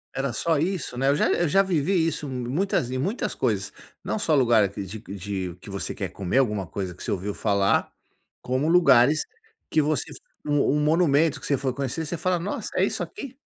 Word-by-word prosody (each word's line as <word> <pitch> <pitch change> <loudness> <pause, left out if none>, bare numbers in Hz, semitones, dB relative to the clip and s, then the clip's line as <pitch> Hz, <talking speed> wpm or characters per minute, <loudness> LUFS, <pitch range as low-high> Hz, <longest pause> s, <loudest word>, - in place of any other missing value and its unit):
Era 135 -2 -1
só 160 +5 0
isso, 170 -6 -2
né, 135 +2 +1
eu 140 - +4
já - - +2
eu 175 - +2
já 195 +5 +4
vivi 175 -1 +1
isso 150 -3 -3
muitas 130 +2 -1
em 130 - -2
muitas 195 - -2
coisas, - - -1 0.3
não 220 - -2
só 160 -6 +2
lugar 115 -6 +4
de 100 0 -6 0.2
de 95 -3 -5
que 100 +2 -11
você 100 - -4
quer - - -4
comer 100 +5 -2
alguma 105 -8 +1
coisa 95 -1 -4
que 90 - -16
você - - -5
ouviu 100 +1 -2
falar, 100 -1 +1 0.5
como 130 +5 -1
lugares 155 -4 +5 0.5
que 155 - +4
você 150 -2 -1
f - - -10 0.3
um 145 -1 +2 0.2
um - - +1
monumento 155 -1 +3
que - - -6
você 140 - +2
foi 130 -1 -2
conhecer, 140 +4 -3
você 165 +3 -3
fala: 180 +2 +1
"Nossa, 180 +4 -4
é - - +4
isso - - -3
aqui?". 275 -9 -7
140 Hz, 210 wpm, -25 LUFS, 110-165 Hz, 0.5 s, lugares